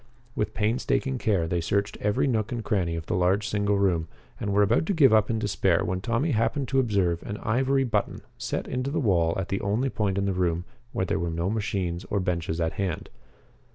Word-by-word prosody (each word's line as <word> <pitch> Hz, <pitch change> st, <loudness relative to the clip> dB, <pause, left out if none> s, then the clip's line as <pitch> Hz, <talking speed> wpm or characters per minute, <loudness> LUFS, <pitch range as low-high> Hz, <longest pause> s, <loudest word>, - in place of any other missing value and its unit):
With 105 Hz, -, -2 dB
painstaking 130 Hz, +4 st, 0 dB
care 100 Hz, -9 st, +1 dB
they 85 Hz, +1 st, 0 dB
searched 100 Hz, +4 st, 0 dB
every 105 Hz, +7 st, +1 dB
nook 115 Hz, -4 st, 0 dB
and 120 Hz, -2 st, -3 dB
cranny 90 Hz, -6 st, 0 dB
of 80 Hz, -1 st, -5 dB
the -, -, -2 dB
large 90 Hz, +4 st, +2 dB
single 100 Hz, -1 st, +1 dB
room 90 Hz, -5 st, +1 dB, 0.3 s
and 100 Hz, -, -2 dB
were 100 Hz, +1 st, +4 dB
about 100 Hz, +9 st, +2 dB
to 200 Hz, -, +1 dB
give 135 Hz, -8 st, +6 dB
up 110 Hz, -1 st, +4 dB
in 115 Hz, -, 0 dB
despair 95 Hz, -5 st, +1 dB
when 90 Hz, +1 st, -2 dB
Tommy 120 Hz, -, 0 dB
happened 120 Hz, +4 st, 0 dB
to 135 Hz, -, +2 dB
observe 100 Hz, -8 st, +1 dB
an 105 Hz, -, -5 dB
ivory 135 Hz, +6 st, +1 dB
button 115 Hz, -5 st, -1 dB
set -, -, -3 dB
into 130 Hz, +1 st, -2 dB
the 145 Hz, -, -1 dB
wall 85 Hz, -, +2 dB
at 95 Hz, -, -3 dB
the 100 Hz, -, -1 dB
only 110 Hz, +7 st, 0 dB
point 100 Hz, -3 st, -1 dB
in 100 Hz, -, +1 dB
the 100 Hz, -, 0 dB
room 90 Hz, -1 st, 0 dB, 0.3 s
where 95 Hz, -, -1 dB
there -, -, -1 dB
were 85 Hz, -, -1 dB
no 85 Hz, +4 st, -1 dB
machines 95 Hz, -5 st, -2 dB
or 100 Hz, -, -1 dB
benches 85 Hz, -3 st, -2 dB
at 80 Hz, -1 st, 0 dB
hand. 90 Hz, -5 st, -3 dB
100 Hz, 220 wpm, -26 LUFS, 90-115 Hz, 0.3 s, give